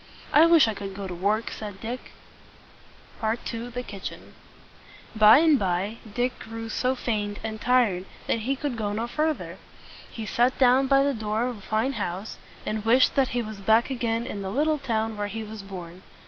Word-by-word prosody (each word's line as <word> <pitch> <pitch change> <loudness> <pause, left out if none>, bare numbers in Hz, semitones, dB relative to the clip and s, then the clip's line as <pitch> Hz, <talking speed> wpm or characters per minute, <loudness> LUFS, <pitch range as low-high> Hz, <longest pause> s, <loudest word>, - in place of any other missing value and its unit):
"I 315 +3 +7
wish 335 -6 +6
I 220 - 0
could 195 -1 -7
go 200 0 -5
to 185 - -5
work!" 205 +6 0
said 205 -3 -7
Dick. 240 +3 -6 1.1
II. 230 +1 -2
THE 250 +1 -5
KITCHEN. 200 -5 -8 0.8
By 215 +2 +8
and 310 -2 +5
by 190 +3 -1
Dick 245 +3 -1
grew 225 0 -7
so 255 +3 0
faint 210 -4 -2
and 220 0 -5
tired 235 -8 +2 0.2
that - - 0
he 260 +5 -1
could 275 -3 -3
go 205 -2 -2
no 225 +3 -1
farther. 305 +5 -2 0.5
He 225 - -6
sat 240 +5 +2
down 260 +1 +5
by 275 0 +5
the 280 0 +1
door 220 0 -1
of 250 -2 -3
a - - -15
fine 220 +7 0
house, 190 -1 -4 0.3
and 215 0 -2
wished 240 +4 +4
that 270 -2 +3
he 240 - +1
was 215 -1 -7
back 220 +6 +3
again 235 -2 -1
in 205 - -5
the 190 - -4
little 300 +7 +1
town 225 -4 -1
where 205 0 -2
he 220 +2 -5
was 215 0 -8
born. 185 -2 -9
225 Hz, 190 wpm, -26 LUFS, 205-250 Hz, 1.1 s, By